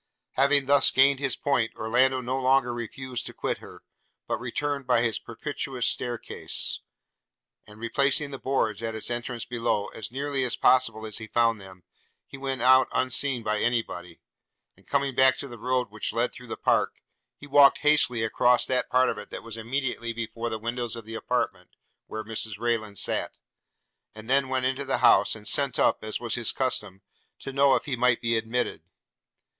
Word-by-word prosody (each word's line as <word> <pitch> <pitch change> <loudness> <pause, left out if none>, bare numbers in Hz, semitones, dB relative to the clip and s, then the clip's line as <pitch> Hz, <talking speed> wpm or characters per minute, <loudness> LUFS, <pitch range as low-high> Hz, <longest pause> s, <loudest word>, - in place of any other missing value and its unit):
Having 140 +1 +3
thus 140 0 +5
gained 135 +1 +4
his 135 -3 0
point, 125 -6 0
Orlando 130 +4 +2
no 130 +2 -2
longer 130 -2 +3
refused 120 +2 -5
to - - -9
quit - - -2
her, - - -13 0.4
but - - -2
returned 140 +2 -3
by 120 -2 +3
his 115 -2 0
propitious 130 +1 -5
stair 120 0 -1
case; - - -1 0.9
and 105 +1 -14
replacing 140 +5 +1
the 135 - -7
boards, 115 -6 -1
at 115 -1 -3
its 110 +2 -3
entrance 120 0 -4
below, 115 -4 -1
as 110 - -7
nearly 140 +1 -2
as 125 -2 0
possible 115 -4 +3
as 110 0 -5
he 110 - -8
found 115 -2 +1
them, 95 -2 -13 0.4
he - - -11
went 135 -2 -3
out 130 +1 +6
unseen 130 -1 0
by 105 0 0
any 120 0 +1
body; 90 -3 -10 0.6
and - - -25
going 140 -1 0
back 130 +1 +5
to 140 - -6
the 120 -3 -10
road 125 -1 -1
which 110 0 -1
led 120 +2 0
through 125 - -12
the - - -6
park, - - +1 0.4
he - - -13
walked 145 -1 +6
hastily 145 -6 +3
across 120 +2 +3
that 130 -1 0
part 130 0 +3
of - - -2
it - - -10
that - - -8
was 115 -1 -8
immediately 115 0 -3
before 115 0 -4
the 110 - -3
windows 120 +1 -4
of 115 -2 -9
the 110 - -9
apartment 110 - -3 0.3
where 110 0 -5
Mrs 110 -1 -4
Rayland 110 -3 -2
sat; - - -1 0.8
and 110 0 -11
then 135 +1 +2
went 130 -1 0
into 130 +2 -1
the 135 - -1
house, - - +5
and 105 -1 -10
sent 140 -3 +1
up, - - +2
as 110 0 -4
was 120 -2 -3
his 120 -2 +1
custom, 105 -7 -2 0.3
to 135 - -8
know 140 0 +4
if - - -2
he 140 - -2
might 125 -1 +2
be 115 0 0
admitted. 115 -4 -1
125 Hz, 190 wpm, -26 LUFS, 115-135 Hz, 0.9 s, out